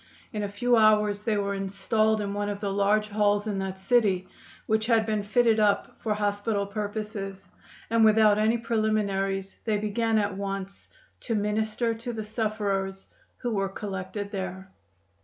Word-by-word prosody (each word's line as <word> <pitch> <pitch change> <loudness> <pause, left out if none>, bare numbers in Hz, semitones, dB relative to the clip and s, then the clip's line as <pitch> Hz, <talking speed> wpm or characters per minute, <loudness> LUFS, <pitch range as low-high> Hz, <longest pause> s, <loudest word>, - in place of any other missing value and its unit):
In 210 - -2
a 205 - -2
few 240 +4 +2
hours 210 -2 +4
they 210 -1 0
were 200 0 -1
installed 210 +3 0
in 200 -1 -3
one 205 0 -2
of 200 -1 -4
the 200 -1 -2
large 210 +2 +2
halls 205 0 +2
in 205 -3 -2
that 190 0 -4
city, 190 -2 +2 0.4
which 220 0 +1
had 225 -2 +3
been 215 -1 0
fitted 225 +2 +3
up 205 -1 +1
for 215 -2 0
hospital 205 0 0
purposes, 205 -1 -5 0.4
and 230 0 +3
without 215 -1 +5
any 220 +2 +3
preliminaries 205 -4 -1
they 215 -2 +1
began 220 +2 0
at 205 -2 0
once 195 0 -5 0.3
to 230 - -2
minister 215 +2 0
to 230 +2 -6
the 220 -1 -4
sufferers 205 -3 -2 0.3
who 240 - 0
were 195 -2 0
collected 200 0 -5
there. 190 -1 -5
210 Hz, 160 wpm, -27 LUFS, 200-220 Hz, 0.4 s, without